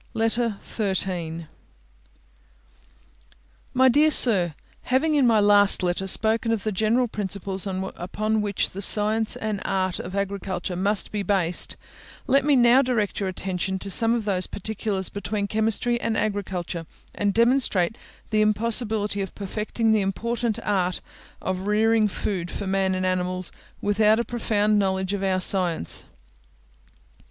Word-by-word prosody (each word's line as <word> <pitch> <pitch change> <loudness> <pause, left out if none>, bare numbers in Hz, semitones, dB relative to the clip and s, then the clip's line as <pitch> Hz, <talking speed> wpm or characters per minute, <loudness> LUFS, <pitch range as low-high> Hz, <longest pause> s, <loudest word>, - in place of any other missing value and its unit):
LETTER 225 -1 0
XIII 180 -5 -3 2.3
My 260 +1 +5
dear 295 +5 +5
Sir, 190 - +6 0.3
Having 280 +5 +1
in 280 -4 +4
my 225 -2 +4
last 205 -1 +5
letter 180 +2 -1
spoken 225 +3 +1
of 220 -3 -1
the 215 - -1
general 220 +5 +1
principles 195 -2 -3
upon 195 +3 -2
which 205 -2 -1
the 195 - -6
science 215 +2 +1
and 215 -2 -3
art 185 -1 -1
of 185 +2 -6
agriculture 195 -2 -3
must 200 +3 -1
be 210 - -2
based, 185 -3 0 0.5
let 275 +1 +3
me 290 0 +3
now 245 +1 +6
direct 240 -6 -1
your 195 -2 -1
attention 190 0 -3
to 195 +1 -4
some 230 +4 +3
of 230 -3 -3
those 185 -3 -1
particulars 205 -2 -3
between 205 +1 -3
chemistry 225 +3 0
and 225 -1 -1
agriculture, 185 -5 -3 0.3
and 205 -1 0
demonstrate 230 -4 +2 0.4
the 215 -1 +2
impossibility 215 -1 0
of 195 - -6
perfecting 215 +3 -2
the 215 -1 +3
important 230 +4 -2
art 185 -3 0 0.4
of 185 +1 -3
rearing 220 +1 +3
food 185 -3 -3
for 200 - -5
man 190 0 0
and 185 0 -2
animals, 185 -1 -2 0.3
without 210 +2 +3
a 235 - -1
profound 215 -3 +1
knowledge 190 0 -1
of 200 - -2
our 190 -1 +1
science. 180 - +1
205 Hz, 140 wpm, -24 LUFS, 190-225 Hz, 2.3 s, Sir